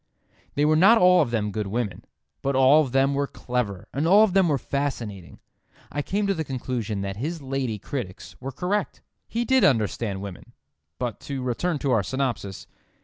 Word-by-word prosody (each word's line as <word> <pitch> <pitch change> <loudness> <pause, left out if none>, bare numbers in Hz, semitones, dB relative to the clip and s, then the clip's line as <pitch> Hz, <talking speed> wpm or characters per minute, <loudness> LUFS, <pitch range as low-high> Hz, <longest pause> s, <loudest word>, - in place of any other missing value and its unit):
They 145 - +2
were 155 +1 +4
not 200 +9 +7
all 180 -2 +6
of - - 0
them 105 -3 -1
good 105 -1 -3
women, 105 -3 -3 0.4
but 140 0 0
all 135 +4 +6
of 135 -5 -2
them 135 +1 +3
were 140 0 0
clever 120 -9 -3
and 145 +5 0
all 200 +5 +7
of 210 -5 +2
them 190 -2 +4
were 145 -3 +2
fascinating. 120 -10 -4 0.5
I 145 - -1
came 200 +7 -1
to 200 - +2
the 160 -4 -2
conclusion 120 -6 -3
that 100 0 -4
his 160 +8 -3
lady 135 -5 -2
critics 100 -3 -6
were 135 +1 -4
correct: 190 +8 -2 0.2
he 235 +1 -2
did 265 0 +3
understand 110 -5 +1
women. 100 +4 -9 0.4
But 120 -4 -3
to 135 -2 -3
return 150 +7 -1
to 135 - +2
our 115 -4 +4
synopsis. 120 -4 -3
130 Hz, 190 wpm, -25 LUFS, 110-155 Hz, 0.5 s, not